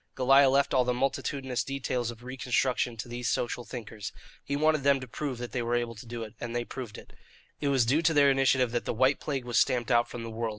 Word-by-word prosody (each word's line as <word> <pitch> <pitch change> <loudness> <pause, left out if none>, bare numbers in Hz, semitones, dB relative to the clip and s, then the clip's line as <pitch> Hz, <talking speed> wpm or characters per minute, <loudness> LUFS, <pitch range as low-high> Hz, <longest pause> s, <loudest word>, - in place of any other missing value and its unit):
Goliah 135 +1 +5
left 140 +1 +2
all 130 - +4
the 125 0 0
multitudinous 135 0 -1
details 130 -3 -2
of 120 0 -9
reconstruction 125 -1 -1
to 115 - -5
these 120 0 -3
social 120 0 -1
thinkers. 110 -4 -7 0.3
He 140 - -3
wanted 155 0 +2
them 140 0 +3
to 130 - -8
prove 135 +1 -4
that 120 0 -6
they 125 - -2
were 120 +1 0
able 120 -1 -1
to 115 +2 -12
do 115 0 -5
it, 110 -1 -9
and 120 0 -4
they 120 0 -1
proved 120 -6 -7
it. - - -13 0.5
It 145 - -1
was 135 -4 +3
due 140 +7 +2
to 165 0 +3
their 140 -1 +6
initiative 130 -2 +3
that 120 -1 -2
the - - -2
white 130 +4 +3
plague 135 -4 -3
was 120 -1 +2
stamped 125 -2 +1
out 120 0 +3
from 120 - -6
the 115 - -6
world. 115 0 -2
125 Hz, 250 wpm, -29 LUFS, 120-135 Hz, 0.5 s, their